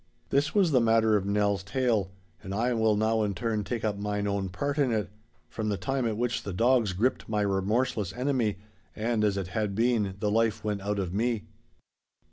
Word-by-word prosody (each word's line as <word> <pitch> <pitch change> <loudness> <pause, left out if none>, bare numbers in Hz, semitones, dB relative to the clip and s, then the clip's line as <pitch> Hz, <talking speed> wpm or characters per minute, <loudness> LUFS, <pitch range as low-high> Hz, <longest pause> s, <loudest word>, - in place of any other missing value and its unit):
This 140 +6 +1
was 190 -5 +4
the 130 -3 +4
matter 110 -1 +4
of 100 -1 0
Nell's 100 -1 +1
tale, 105 -1 0 0.3
and 100 -1 -5
I 120 +4 +1
will 110 -2 +2
now 110 +1 +1
in 100 -2 -1
turn 110 +2 -1
take 110 +3 -3
up 105 -2 -1
mine 105 0 -2
own 100 -1 -1
part 140 +10 -2
in 135 -4 +3
it, 105 -4 -1 0.4
from 110 -1 -3
the 100 - 0
time 135 +2 -1
at 110 -2 -2
which 120 0 -1
the 100 - -5
dogs 115 0 +3
gripped 115 +7 0
my 105 -1 0
remorseless 100 +1 0
enemy, 125 -4 0 0.4
and 110 0 0
as 100 -2 +2
it 95 -2 -3
had 105 0 -2
been, 110 -4 +1
the 105 +1 0
life 110 -1 +1
went 105 -2 -2
out 105 +1 -2
from 95 -2 -2
me. 115 0 0
110 Hz, 205 wpm, -28 LUFS, 100-120 Hz, 0.4 s, was